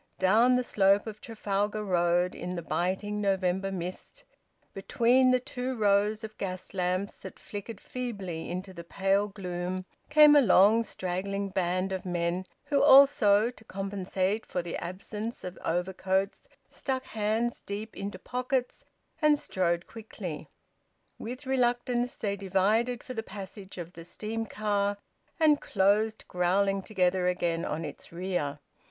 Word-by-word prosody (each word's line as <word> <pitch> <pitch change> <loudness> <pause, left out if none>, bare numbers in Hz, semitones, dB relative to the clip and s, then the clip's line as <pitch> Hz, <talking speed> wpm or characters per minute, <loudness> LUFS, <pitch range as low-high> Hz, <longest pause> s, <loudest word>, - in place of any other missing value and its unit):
Down 225 +7 +4
the 250 - +2
slope 200 -3 +3
of 215 -1 -8
Trafalgar 210 -1 -2
Road, 175 -1 +2
in 180 +1 -5
the 170 - -4
biting 190 +5 -1
November 190 -1 0
mist, 185 - -6 0.5
between 240 +6 +3
the 255 0 +4
two 255 +1 -4
rows 210 0 +2
of 215 0 -8
gas 185 -1 -5
lamps 185 +1 -1
that - - -10
flickered 205 +1 -7
feebly 200 -11 -5
into 185 +2 -5
the 170 - -8
pale 195 +3 +1
gloom, 185 -2 -4 0.2
came 300 0 +8
a 290 - +8
long 210 0 +6
straggling 195 -1 -3
band 185 0 0
of 190 -1 -3
men 175 +1 -1 0.2
who 285 -2 +1
also, 250 -6 +6
to 235 - -17
compensate 195 +1 -2
for 180 - -3
the 170 - -5
absence 210 +5 -6
of 180 0 -6
overcoats, 190 +3 -1 0.2
stuck 260 -2 -3
hands 220 +2 -1
deep 210 +2 -6
into 200 +1 -5
pockets, 250 0 -2 0.4
and 300 -1 +5
strode 175 -8 -1
quickly. 210 -7 -8 0.7
With 250 +5 -6
reluctance 245 -1 +1
they 200 -2 -2
divided 205 +5 +1
for 255 - -7
the 225 - -2
passage 195 -2 -9
of 175 0 -7
the 165 - -10
steam 220 +6 -5
car, 205 -1 0 0.4
and 305 -2 +4
closed 210 +3 +1
growling 195 +2 +1
together 185 -3 +1
again 175 -2 0
on 160 +2 -3
its 145 - -9
rear. 170 -5 -2
200 Hz, 140 wpm, -29 LUFS, 185-225 Hz, 0.7 s, came